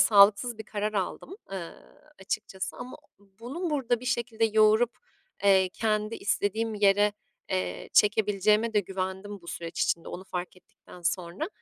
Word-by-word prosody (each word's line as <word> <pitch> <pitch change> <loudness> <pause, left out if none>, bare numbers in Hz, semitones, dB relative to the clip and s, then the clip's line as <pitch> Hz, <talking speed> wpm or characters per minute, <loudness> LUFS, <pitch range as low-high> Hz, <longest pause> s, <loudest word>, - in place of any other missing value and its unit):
sağlıksız 210 +3 +5
bir 220 - -6
karar 210 0 -2
aldım, 210 - -3 0.2
eee, 180 -4 -5 0.5
açıkçası 190 +2 -4
ama 250 +1 -8 0.2
o - - -22 0.2
bunu 315 +9 -4
burada 250 -5 0
bir - - -9
şekilde 235 -2 0
yoğurup, 220 +2 +4 0.5
eee, 190 -2 +5
kendi 215 0 0
istediğim 215 +1 -1
yere, 205 0 +4 0.4
eee, 90 -1 -2
çekebileceğime 210 +1 +3
de 210 - +5
güvendim 190 +1 -5
bu - - -15
süreç 170 0 -5
içinde, 170 - 0
onu 185 - -7
fark 180 -1 -5
ettikten 180 0 -17
sonra. 175 - -2
210 Hz, 145 wpm, -28 LUFS, 190-225 Hz, 0.5 s, sağlıksız